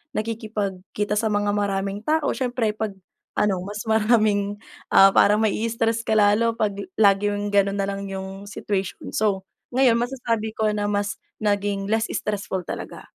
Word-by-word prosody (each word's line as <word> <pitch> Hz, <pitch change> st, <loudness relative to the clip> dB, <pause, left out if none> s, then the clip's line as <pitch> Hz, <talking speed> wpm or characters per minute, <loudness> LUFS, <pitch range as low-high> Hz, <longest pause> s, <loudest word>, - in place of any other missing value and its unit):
nakikipagkita 210 Hz, -2 st, -3 dB
sa 225 Hz, -, +1 dB
mga 205 Hz, 0 st, +1 dB
maraming 200 Hz, 0 st, -1 dB
tao. 315 Hz, 0 st, +1 dB
Siyempre 245 Hz, -4 st, 0 dB
'pag 215 Hz, -1 st, -2 dB, 0.5 s
ano, 190 Hz, -3 st, +1 dB
mas 205 Hz, +2 st, -6 dB
maraming, 215 Hz, -2 st, +2 dB, 0.3 s
ah, 195 Hz, -, +8 dB
parang 210 Hz, +1 st, +5 dB
ma 220 Hz, -, +3 dB
i-stress 225 Hz, +2 st, 0 dB
ka -, -, -3 dB
lalo 210 Hz, +3 st, +4 dB
'pag 205 Hz, -2 st, +1 dB, 0.2 s
laging 205 Hz, 0 st, +3 dB
ganun 200 Hz, 0 st, +2 dB
nalang 195 Hz, 0 st, -2 dB
yung 190 Hz, +1 st, -6 dB
situation. 200 Hz, -1 st, -4 dB
So, 195 Hz, -3 st, 0 dB, 0.2 s
ngayon 250 Hz, -2 st, +4 dB
masasabi 235 Hz, -3 st, -1 dB
ko 220 Hz, 0 st, 0 dB
na 205 Hz, 0 st, -1 dB
mas 205 Hz, +2 st, -1 dB, 0.2 s
naging 200 Hz, -1 st, 0 dB
less 220 Hz, +1 st, 0 dB
stressful 200 Hz, -3 st, -3 dB
talaga. -, -, -7 dB
205 Hz, 145 wpm, -23 LUFS, 200-220 Hz, 0.5 s, ah